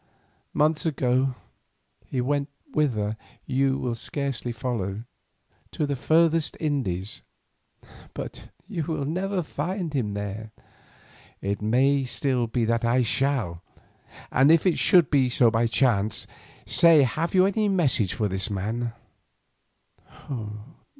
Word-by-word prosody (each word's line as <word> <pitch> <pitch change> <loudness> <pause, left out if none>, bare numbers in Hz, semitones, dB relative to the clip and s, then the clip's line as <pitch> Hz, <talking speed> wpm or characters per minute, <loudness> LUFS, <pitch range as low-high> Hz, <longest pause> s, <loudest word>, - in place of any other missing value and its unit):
Months 150 +1 +2
ago 130 -3 +1 0.7
he 130 - -1
went 140 +2 -1 0.2
whither 110 -8 0 0.3
you 135 +1 +1
will 125 -3 -2
scarcely 130 +1 -3
follow, 110 -4 -3 0.7
to 150 - 0
the 140 -1 -1
furthest 165 +3 +2
Indies; 105 - -2 0.9
but - - -7 0.2
you 165 - -3
will 155 -3 -2
never 185 +4 -1
find 170 +3 -3
him 110 -7 -1
there." 105 +2 -5 0.9
"It 100 +1 -3
may 135 +6 +3
still 125 -1 -1
be 115 0 0
that 115 +1 0
I 120 +2 +3
shall, 115 -8 0 0.7
and 135 +4 +5
if 165 +1 +4
it 180 - +2
should 175 -3 +6 0.3
so 120 -1 +4 0.2
chance, 110 -2 +1 0.4
say 165 -4 +6
have 155 +9 -1
you 185 0 +6
any 205 +2 +1
message 140 - +1
for 105 - 0
this 95 +1 -2
man?" 110 +4 -3
130 Hz, 115 wpm, -25 LUFS, 110-155 Hz, 0.9 s, should